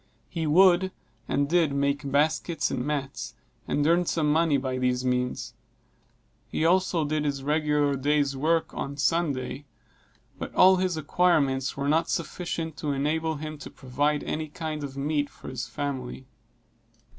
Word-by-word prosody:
He 165 Hz, -3 st, -2 dB
would, 185 Hz, +3 st, +5 dB, 0.4 s
and 140 Hz, 0 st, +1 dB
did, 165 Hz, -3 st, +2 dB
make 140 Hz, 0 st, 0 dB
baskets 155 Hz, +3 st, +1 dB
and 125 Hz, -, -2 dB
mats, 140 Hz, -1 st, -3 dB, 0.3 s
and 145 Hz, -, +1 dB
earned 170 Hz, +2 st, +3 dB
some 150 Hz, -3 st, +1 dB
money 160 Hz, -2 st, +3 dB
by 130 Hz, -1 st, -2 dB
these 125 Hz, 0 st, 0 dB
means; 125 Hz, 0 st, -1 dB, 0.9 s
he 160 Hz, -, -1 dB
also 175 Hz, -2 st, +2 dB
did 150 Hz, +1 st, -1 dB
his 140 Hz, -2 st, -2 dB
regular 150 Hz, -1 st, +1 dB
day's 140 Hz, 0 st, +1 dB
work 160 Hz, +4 st, +1 dB
on 140 Hz, +1 st, -5 dB
Sunday; 145 Hz, -3 st, 0 dB, 0.7 s
but -, -, -6 dB
all 190 Hz, 0 st, +7 dB
his 180 Hz, -2 st, 0 dB
acquirements 145 Hz, -5 st, +1 dB
were 140 Hz, 0 st, -1 dB
not 160 Hz, +3 st, +2 dB
sufficient 165 Hz, -2 st, -3 dB
to 150 Hz, -, -2 dB
enable 155 Hz, +3 st, 0 dB
him 155 Hz, 0 st, -6 dB
to -, -, -8 dB
provide 145 Hz, +3 st, -1 dB
any 155 Hz, 0 st, -3 dB
kind 155 Hz, -1 st, -5 dB
of 140 Hz, -1 st, -6 dB
meat 145 Hz, +1 st, 0 dB
for -, -, -11 dB
his 130 Hz, -2 st, -4 dB
family. 135 Hz, -3 st, -5 dB
150 Hz, 150 wpm, -27 LUFS, 140-160 Hz, 0.9 s, all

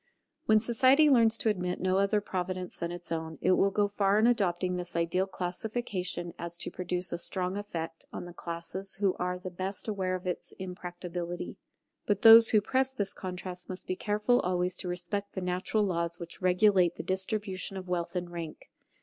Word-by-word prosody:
When 215 Hz, 0 st, +6 dB
society 260 Hz, +6 st, +4 dB
learns 230 Hz, -3 st, +5 dB
to 225 Hz, -, +1 dB
admit 180 Hz, -3 st, -1 dB
no 185 Hz, +1 st, +1 dB
other 200 Hz, +1 st, +2 dB
Providence 185 Hz, -2 st, -4 dB
than 170 Hz, 0 st, -3 dB
its 175 Hz, -1 st, -6 dB
own, 160 Hz, -1 st, -3 dB
it 185 Hz, -, +2 dB
will 195 Hz, +2 st, +4 dB
go 205 Hz, +1 st, +1 dB
so 200 Hz, -, -19 dB
far 200 Hz, 0 st, +2 dB
in 220 Hz, -, +4 dB
adopting 185 Hz, -6 st, +1 dB
this 180 Hz, -1 st, -5 dB
ideal 170 Hz, +3 st, +1 dB
classification 185 Hz, -1 st, -3 dB
as 170 Hz, 0 st, -3 dB
to -, -, -2 dB
produce 180 Hz, 0 st, -2 dB
a 170 Hz, -, -2 dB
strong 185 Hz, +1 st, +2 dB
effect 165 Hz, -5 st, -5 dB
on -, -, -6 dB
the 175 Hz, -, -10 dB
classes 170 Hz, +3 st, -4 dB
who 195 Hz, -2 st, +1 dB
are 180 Hz, 0 st, -1 dB
the 185 Hz, 0 st, -7 dB
best 190 Hz, +4 st, -3 dB
aware 190 Hz, -3 st, -1 dB
of 185 Hz, +1 st, -7 dB
its 180 Hz, -1 st, -4 dB
impracticability. 175 Hz, -1 st, -6 dB, 0.5 s
But 205 Hz, -1 st, 0 dB
those 225 Hz, 0 st, +10 dB
who 215 Hz, -, +5 dB
press 265 Hz, +4 st, 0 dB
this 200 Hz, -4 st, -2 dB
contrast 180 Hz, -1 st, -6 dB
must 185 Hz, 0 st, -6 dB
be 185 Hz, -, -2 dB
careful 210 Hz, +5 st, +1 dB
always 180 Hz, 0 st, +1 dB
to -, -, -4 dB
respect 180 Hz, +3 st, -3 dB
the 190 Hz, -, -4 dB
natural 180 Hz, +4 st, 0 dB
laws 170 Hz, -3 st, -1 dB
which 170 Hz, +1 st, -7 dB
regulate 185 Hz, -1 st, +4 dB
the -, -, -6 dB
distribution 190 Hz, 0 st, -2 dB
of 185 Hz, -1 st, -7 dB
wealth 175 Hz, 0 st, -2 dB
and 175 Hz, -1 st, -3 dB
rank. 165 Hz, -2 st, -8 dB
185 Hz, 190 wpm, -29 LUFS, 175-205 Hz, 0.5 s, those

